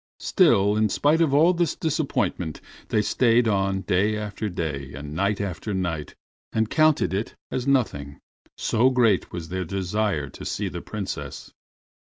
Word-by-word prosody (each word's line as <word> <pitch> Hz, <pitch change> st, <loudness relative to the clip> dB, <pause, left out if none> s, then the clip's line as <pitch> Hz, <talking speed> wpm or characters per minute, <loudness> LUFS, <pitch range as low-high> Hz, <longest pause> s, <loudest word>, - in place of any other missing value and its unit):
Still, 105 Hz, -, +4 dB
in 110 Hz, 0 st, +2 dB
spite 150 Hz, -, +2 dB
of 160 Hz, -4 st, +3 dB
all 160 Hz, +6 st, +5 dB
this 170 Hz, -3 st, 0 dB
disappointment 105 Hz, -, -1 dB, 0.3 s
they 105 Hz, -, +1 dB
stayed 120 Hz, 0 st, +3 dB
on 95 Hz, -2 st, +1 dB
day 105 Hz, +3 st, +1 dB
after 105 Hz, 0 st, -4 dB
day, 75 Hz, -6 st, -4 dB
and 75 Hz, +1 st, -7 dB
night 100 Hz, +5 st, 0 dB
after 100 Hz, +1 st, -3 dB
night, 85 Hz, -5 st, -3 dB, 0.4 s
and 110 Hz, -1 st, 0 dB
counted 155 Hz, -9 st, +3 dB
it 100 Hz, +4 st, -3 dB, 0.2 s
as 130 Hz, 0 st, -2 dB
nothing, 70 Hz, -, 0 dB, 0.4 s
so 120 Hz, +4 st, +3 dB
great 120 Hz, -7 st, +2 dB
was 85 Hz, -2 st, -6 dB
their 95 Hz, +1 st, -2 dB
desire 95 Hz, -3 st, -1 dB
to -, -, -11 dB
see -, -, -2 dB
the -, -, -6 dB
Princess. -, -, -6 dB
105 Hz, 155 wpm, -24 LUFS, 90-125 Hz, 0.4 s, all